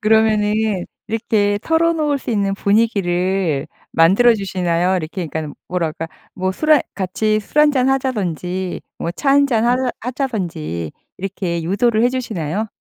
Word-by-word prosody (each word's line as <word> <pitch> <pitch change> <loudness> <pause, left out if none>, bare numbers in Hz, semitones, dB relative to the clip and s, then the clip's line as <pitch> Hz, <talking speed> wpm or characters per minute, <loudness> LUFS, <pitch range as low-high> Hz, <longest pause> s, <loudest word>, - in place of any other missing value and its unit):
그러면은 215 -2 +2 0.2
이렇게 210 -2 +1
털어 330 +1 +2
놓을 300 -3 0
수 250 - -6
있는 200 -2 +1
분위기를 190 -7 +1 0.3
만들어 200 +9 +5
주시나요? 180 -2 0
이렇게 170 +2 -4
그러니까는 155 -1 -5
뭐라 175 -3 -1
그럴까? 165 +1 -6 0.3
뭐 185 0 -1
술에 310 +6 +3
같이 215 +3 0
술 295 - -5
한 300 -1 +6
잔 260 -1 +2
하자든지 190 - -1 0.2
뭐 170 - -2
차 275 +10 -1
한 280 0 +5
잔 230 -4 +1
하자 250 +1 +2
하자든지 180 - -3 0.3
이렇게 180 -3 -3
유도를 215 +6 +2
해 - - +5
주시나요? 215 - -2
205 Hz, 335 characters per minute, -19 LUFS, 180-240 Hz, 0.3 s, 한